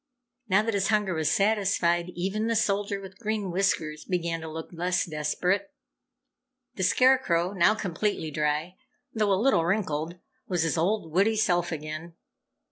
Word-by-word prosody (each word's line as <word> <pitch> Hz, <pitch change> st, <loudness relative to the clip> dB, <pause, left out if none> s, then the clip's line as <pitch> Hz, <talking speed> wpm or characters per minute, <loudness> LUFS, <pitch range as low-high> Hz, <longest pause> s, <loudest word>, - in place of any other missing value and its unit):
Now 195 Hz, +3 st, +4 dB
that 225 Hz, 0 st, -1 dB
his 195 Hz, -1 st, +1 dB
hunger 210 Hz, -4 st, +1 dB
was 160 Hz, -2 st, 0 dB
satisfied, 195 Hz, -4 st, +2 dB
even 195 Hz, +5 st, -1 dB
the 230 Hz, -, +1 dB
Soldier 200 Hz, -2 st, 0 dB
with 190 Hz, 0 st, -11 dB
Green 215 Hz, -4 st, -2 dB
Whiskers 165 Hz, -5 st, 0 dB
began 170 Hz, -2 st, -2 dB
to 160 Hz, -, -6 dB
look 160 Hz, +1 st, -7 dB
less 180 Hz, +1 st, 0 dB
desperate. 180 Hz, -, -1 dB, 1.0 s
The -, -, -6 dB
Scarecrow, 185 Hz, -4 st, +3 dB
now 200 Hz, +3 st, +4 dB
completely 190 Hz, -4 st, -2 dB
dry 150 Hz, +4 st, -1 dB, 0.4 s
though 215 Hz, -2 st, +1 dB
a 190 Hz, -, +3 dB
little 230 Hz, -7 st, +3 dB
wrinkled, 170 Hz, -3 st, -1 dB, 0.3 s
was 175 Hz, -3 st, 0 dB
his 165 Hz, -, 0 dB
old, 170 Hz, 0 st, 0 dB
witty 200 Hz, +6 st, +3 dB
self 175 Hz, -5 st, +1 dB
again. 155 Hz, +2 st, -6 dB
185 Hz, 150 wpm, -27 LUFS, 165-205 Hz, 1.0 s, Now